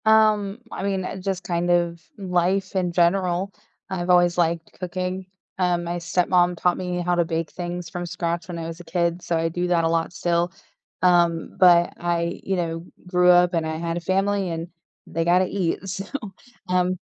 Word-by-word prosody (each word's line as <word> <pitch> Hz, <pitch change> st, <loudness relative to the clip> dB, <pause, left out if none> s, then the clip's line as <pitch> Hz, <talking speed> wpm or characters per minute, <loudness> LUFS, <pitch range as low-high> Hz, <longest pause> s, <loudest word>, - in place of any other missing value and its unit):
Um, 215 Hz, -1 st, +4 dB
I -, -, -5 dB
mean, 195 Hz, -2 st, -1 dB
uh, 190 Hz, -, -5 dB
just 190 Hz, -1 st, -3 dB
kind 175 Hz, 0 st, -1 dB
of 170 Hz, -1 st, +1 dB, 0.2 s
life 190 Hz, 0 st, 0 dB
in 180 Hz, -2 st, +1 dB
general, 180 Hz, +2 st, +1 dB, 0.4 s
I've 180 Hz, -2 st, -3 dB
always 175 Hz, -1 st, +4 dB
liked 170 Hz, -1 st, 0 dB
cooking, 185 Hz, +1 st, -3 dB, 0.3 s
uh, 180 Hz, -1 st, +2 dB
my 175 Hz, 0 st, -3 dB
stepmom 175 Hz, +1 st, +2 dB
taught 180 Hz, +1 st, +2 dB
me 180 Hz, -1 st, -2 dB
how 175 Hz, 0 st, 0 dB
to 175 Hz, -1 st, +3 dB
bake 165 Hz, -1 st, -2 dB
things 175 Hz, -1 st, -5 dB
from 175 Hz, +1 st, -4 dB
scratch 170 Hz, -1 st, -3 dB
when 175 Hz, -2 st, -5 dB
I 165 Hz, -, -4 dB
was 165 Hz, +1 st, -7 dB
a -, -, -9 dB
kid, 170 Hz, +1 st, -1 dB
so 170 Hz, -, -1 dB
I 165 Hz, 0 st, 0 dB
do 175 Hz, +2 st, -2 dB
that 175 Hz, -2 st, +2 dB
a 165 Hz, -, +2 dB
lot 165 Hz, 0 st, 0 dB
still. 175 Hz, -1 st, 0 dB, 0.5 s
Um, 170 Hz, -2 st, +3 dB
but 175 Hz, -2 st, +6 dB
I, 170 Hz, 0 st, -1 dB
you 195 Hz, -, -1 dB
know, 165 Hz, -1 st, -3 dB, 0.2 s
grew 180 Hz, 0 st, +4 dB
up 180 Hz, 0 st, +6 dB
and 165 Hz, -2 st, 0 dB
I 160 Hz, 0 st, -3 dB
had 170 Hz, +1 st, -2 dB
a -, -, -1 dB
family 195 Hz, +2 st, 0 dB
and 165 Hz, +1 st, -4 dB, 0.4 s
they 165 Hz, -, -1 dB
gotta 180 Hz, +2 st, +4 dB
eat, 190 Hz, 0 st, -2 dB
so, 195 Hz, +1 st, -4 dB, 0.6 s
um 180 Hz, 0 st, +2 dB
175 Hz, 195 wpm, -23 LUFS, 170-185 Hz, 0.6 s, but